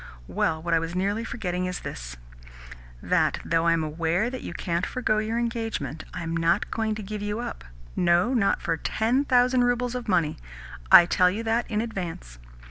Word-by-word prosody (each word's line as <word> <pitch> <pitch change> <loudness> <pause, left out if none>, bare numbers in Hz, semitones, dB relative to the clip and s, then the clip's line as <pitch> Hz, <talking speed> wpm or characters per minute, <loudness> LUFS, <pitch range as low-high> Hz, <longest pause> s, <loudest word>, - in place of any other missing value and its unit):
Well, 160 0 -1
what 170 0 -1
I 165 - +4
was 165 +1 -5
nearly 200 +4 0
forgetting 180 -6 -3
is 180 - -4
this: - - -7 0.9
that, - - +2
though 165 0 +1
I 165 - +5
am 165 -1 0
aware 165 +8 0
that 260 - -6
you - - -6
can't 170 0 -2
forgo 215 -2 0
your 220 +2 -2
engagement, 225 - -3
I 180 - -5
am 165 0 -3
not 165 +4 +1
going 220 -1 -1
to 215 - -6
give 210 +1 -5
you 205 +2 -2
up 240 - -6 0.3
no, 175 +7 +3
not 220 -6 +1
for 165 -2 0
ten 240 - 0
thousand 250 -1 +4
roubles 245 0 0
of 250 -1 -5
money. 165 -5 +1 0.5
I 175 - +10
tell 180 +1 +3
you 210 +5 -3
that 230 +1 0
in 215 -1 0
advance." 175 - -6
195 Hz, 195 wpm, -26 LUFS, 165-230 Hz, 0.9 s, I